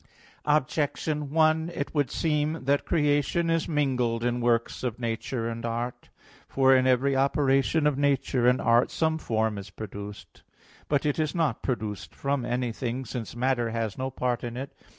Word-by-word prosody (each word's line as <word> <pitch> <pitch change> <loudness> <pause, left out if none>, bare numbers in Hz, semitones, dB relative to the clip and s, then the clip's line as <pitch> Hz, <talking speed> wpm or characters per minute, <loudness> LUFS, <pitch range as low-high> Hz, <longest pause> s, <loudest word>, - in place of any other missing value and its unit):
Objection 150 0 0
1: 160 +1 +3
It 140 - -3
would 145 -4 +1
seem 155 -1 0
that 140 +1 +1
creation 150 +2 +2
is 165 -1 +1
mingled 125 -7 0
in 120 0 0
works 115 -1 +1
of 120 -3 -2
nature 115 0 -3
and 115 0 -5
art. 120 +1 -4 0.4
For 135 -1 +4
in 130 0 +3
every 130 +2 +3
operation 135 +2 +2
of 145 -2 +2
nature 135 -3 +2
and 125 +1 +4
art 115 +1 +3
some 160 0 0
form 110 -5 -1
is 100 0 -9
produced. 100 0 -9 0.5
But 145 0 +1
it 145 +1 0
is 155 0 0
not 155 -9 0
produced 105 -8 -4
from 140 -2 -1
anything, 125 +1 -2
since 115 -1 -6
matter 120 -1 +1
has 115 -3 -2
no 130 0 -3
part 125 -2 -2
in 120 0 -5
it. 135 +2 -6
130 Hz, 165 wpm, -27 LUFS, 115-145 Hz, 0.5 s, For